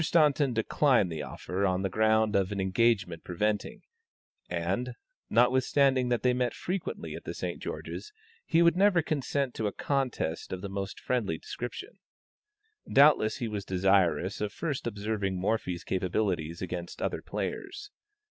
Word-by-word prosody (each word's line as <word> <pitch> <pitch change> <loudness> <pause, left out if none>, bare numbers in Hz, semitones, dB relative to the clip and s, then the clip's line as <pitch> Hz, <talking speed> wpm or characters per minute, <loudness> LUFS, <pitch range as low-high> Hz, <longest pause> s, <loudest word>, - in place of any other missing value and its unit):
Staunton 150 -4 +3
declined 115 - +2
the 80 -2 -4
offer 90 +8 -4
on 95 -1 +1
the - - +2
ground 110 +1 +2
of 100 0 +2
an 100 - -3
engagement 95 -3 +1
preventing, 105 +4 -2 0.7
and, 95 +9 -2 0.3
notwithstanding 130 +2 +3
that 120 -3 0
they 125 -1 +4
met 125 -1 0
frequently 185 0 -4
at - - -7
the - - -6
St. - - -4
George's, 425 - -6 0.3
he 165 +1 +3
would 170 0 +5
never 190 -3 +4
consent 140 -3 -1
to 110 - -1
a - - -1
contest 130 - -2
of 95 - -4
the 100 - -5
most 95 -1 -4
friendly 110 -10 -1
description. 125 - -7 0.9
Doubtless 140 -6 +5
he 120 - -2
was 105 -2 -4
desirous 95 -1 +2
of 105 -1 -1
first 150 -7 -3
observing 105 -2 -2
Morphy's 90 -4 -1
capabilities 90 -3 -1
against 85 -1 -5
other - - -2
players. 410 +1 -5
110 Hz, 150 wpm, -29 LUFS, 95-130 Hz, 0.9 s, would